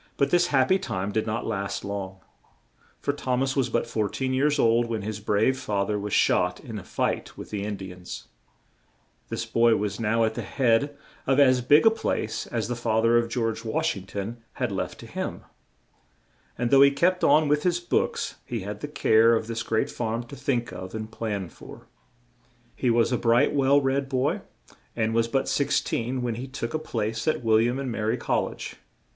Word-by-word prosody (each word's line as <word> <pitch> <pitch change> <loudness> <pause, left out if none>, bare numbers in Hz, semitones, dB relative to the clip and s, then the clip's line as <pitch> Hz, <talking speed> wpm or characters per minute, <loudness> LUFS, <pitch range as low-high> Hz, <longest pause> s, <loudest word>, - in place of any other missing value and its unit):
But 140 - +2
this 175 0 +4
hap 130 -5 +2
py 190 - +4
time 95 - -3
did 110 +1 -1
not 110 +2 -2
last 100 0 -3
long, 95 -1 -5 0.8
for - - 0
Thom 130 -2 -1
as 135 0 -1
was 130 -3 +1
but - - 0
four 105 -2 -1
teen 130 -1 -2
years 145 +3 +2
old 115 -2 +3
when 110 -3 -3
his 105 0 -4
brave 110 +5 +1
fa 100 -4 -1
ther 105 0 -1
was 105 0 -5
shot 90 -1 +2
in 110 -3 -7
a - - -10
fight - - -2
with - - -9
the 100 -2 -3
In 105 0 -3
di 95 -1 -8
ans. 90 0 -9 1.0
This - - -3
boy 115 -1 +3
was 100 0 -2
now 115 +1 +2
at 110 0 +1
the - - -4
head 135 +3 +1 0.3
of 135 +1 +3
as 130 -3 +5
big 145 - +5
a 225 - +8
place 225 - -2
as 115 -2 -2
the 120 - -2
fa 115 -2 0
ther 115 +1 +3
of 120 0 +2
George 115 -2 -2
Wash 110 -1 0
ing 95 -1 -9
ton 100 +4 -5 0.2
had 125 -4 -2
left 95 - -4
to - - -10
him, - - -5 1.1
and 120 0 -1
though 135 -1 +7
he 140 - +8
kept 180 +6 +1
on 150 +2 +5
with 150 +1 +2
his 175 0 +1
books 175 - -1
he 115 -3 -4
had 105 +2 -6
the 145 - -5
care 115 -5 +4
of 110 - -1
this 115 0 -3
great 110 -2 0
farm 115 0 -2
to 120 +4 -11
think 120 -5 -1
of 95 +2 -7
and 110 0 -5
plan 105 -5 -3
for. - - -13 0.9
He 125 - 0
was 115 0 +3
a 125 - +1
bright, 120 +5 +3
well 140 0 +4
read 135 0 0
boy; 130 +1 0 0.5
and 115 -1 0
was 115 0 +2
but 135 +3 0
six 140 - +2
teen 125 +2 -2
when 120 -1 -1
he 125 +4 -6
took 120 -3 -5
a 155 - 0
place 110 -6 -3
at 155 - +1
Wil 110 -1 +4
liam 120 +3 +1
and 135 -3 -3
Ma 115 - -4
ry 110 +2 +1
Col - - 0
lege. - - -8
115 Hz, 215 wpm, -26 LUFS, 110-135 Hz, 1.1 s, a